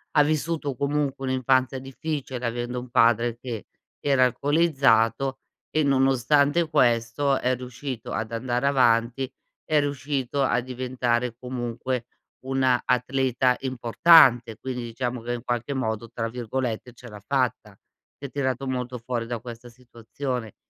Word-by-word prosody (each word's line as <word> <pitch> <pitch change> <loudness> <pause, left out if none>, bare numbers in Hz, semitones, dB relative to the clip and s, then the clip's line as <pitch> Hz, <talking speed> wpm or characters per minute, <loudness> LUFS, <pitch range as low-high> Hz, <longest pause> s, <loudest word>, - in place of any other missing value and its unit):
ha 150 - +7
vissuto 155 -1 -1
comunque 140 0 -1
un'infanzia 130 0 +1
difficile, 135 -2 -5
avendo 120 +1 -3
un 125 0 -9
padre 120 -1 +3
che 120 -4 -6 0.3
era 135 -3 +3
alcolizzato 135 -3 +2 0.3
e 155 -1 +1
nonostante 140 +4 +3
questo 130 0 +2
è 125 0 +1
riuscito 125 -1 -7
ad 110 0 -3
andare 120 +2 -1
avanti, 125 0 +2 0.3
è 155 -1 +2
riuscito 140 -1 -2
a 125 -2 +2
diventare 125 -1 -2
comunque 125 0 -4 0.4
una 130 -2 +2
atleta 125 0 +1
importante, 120 -2 +5
quindi 125 -1 -5
diciamo 120 +1 -4
che 120 +1 -3
in 120 0 -5
qualche 120 +3 -2
modo, 115 -3 -2
tra 115 -1 -3
virgolette, 120 0 -4
"ce 125 0 -13
l'ha 105 -3 -11
fatta". 120 -6 -1 0.4
Si 140 - -9
è - - -5
tirato 135 -1 -2
molto 125 -1 -3
fuori 120 -1 -4
da 120 -2 -3
questa 120 +1 -10
situazione. 125 -1 -6
125 Hz, 135 wpm, -25 LUFS, 120-135 Hz, 0.4 s, ha